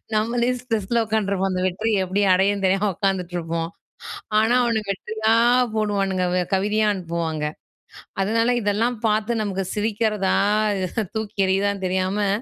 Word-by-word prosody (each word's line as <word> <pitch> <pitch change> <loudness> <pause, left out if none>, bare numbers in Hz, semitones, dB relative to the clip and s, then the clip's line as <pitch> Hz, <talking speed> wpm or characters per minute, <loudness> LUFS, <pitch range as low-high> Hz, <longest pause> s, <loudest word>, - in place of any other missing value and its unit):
நம்மளே 235 +3 +1
ஸ்ட்ரெஸில 230 -2 -1
உட்காந்துருப்போம் 200 -3 0
அந்த 185 0 -1
வெற்றியை 215 +4 0
எப்படி 190 +3 -1
அடையனு 195 +2 +2
தெரியாம 195 +2 +2
உட்காந்துட்டு 185 -2 -1
இருப்போம். 165 0 -3 0.7
ஆனா 225 +3 +3
அவன 230 -2 0
வெற்றியா 220 +3 -1 0.4
போடுவானுங்க 195 -3 0 0.3
கவிதையா 210 +3 +1
அனுப்புவாங்க. 165 -4 -3 0.8
அதனால 230 +4 +2
இதெல்லாம் 220 +3 0
பார்த்து 220 +2 0
நமக்கு 195 -2 -2
சிரிக்கிறதா 210 -2 0 0.8
தூக்கி 220 -2 -4
எறியுறதான்னு 195 +1 0
தெரியாம 190 +2 0
205 Hz, 115 wpm, -22 LUFS, 190-220 Hz, 0.8 s, ஆனா